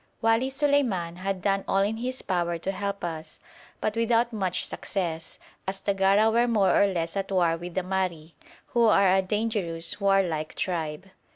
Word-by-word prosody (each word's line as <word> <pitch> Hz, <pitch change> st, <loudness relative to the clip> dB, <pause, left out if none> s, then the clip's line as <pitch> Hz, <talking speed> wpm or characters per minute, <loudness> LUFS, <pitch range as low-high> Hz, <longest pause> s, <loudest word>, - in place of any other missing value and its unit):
Wali 225 Hz, +3 st, +2 dB
Suleiman 265 Hz, -, +1 dB
had 190 Hz, 0 st, -3 dB
done 195 Hz, -1 st, +1 dB
all 195 Hz, 0 st, +2 dB
in 215 Hz, +2 st, -1 dB
his 255 Hz, +2 st, -4 dB
power 175 Hz, -2 st, -1 dB
to 185 Hz, +4 st, -2 dB
help 200 Hz, 0 st, -4 dB
us, 160 Hz, -2 st, -6 dB, 0.4 s
but 215 Hz, -, -1 dB
without 230 Hz, +1 st, +2 dB
much 190 Hz, -4 st, -1 dB
success, 165 Hz, -5 st, -4 dB, 0.3 s
as 190 Hz, 0 st, -2 dB
the 200 Hz, -, 0 dB
Gara 195 Hz, +3 st, +4 dB
were 235 Hz, +2 st, +3 dB
more 210 Hz, -5 st, +3 dB
or 200 Hz, -, +5 dB
less 170 Hz, -3 st, -2 dB
at 195 Hz, 0 st, -3 dB
war 175 Hz, -3 st, +3 dB
with 175 Hz, +1 st, -8 dB
the 185 Hz, -, 0 dB
Mahri, 180 Hz, -4 st, -2 dB, 0.4 s
who 235 Hz, -1 st, +3 dB
are 200 Hz, -3 st, +5 dB
a 190 Hz, -, +4 dB
dangerous 195 Hz, -4 st, -2 dB
warlike 185 Hz, -6 st, +1 dB
tribe. 165 Hz, 0 st, -3 dB
195 Hz, 175 wpm, -26 LUFS, 175-215 Hz, 0.4 s, or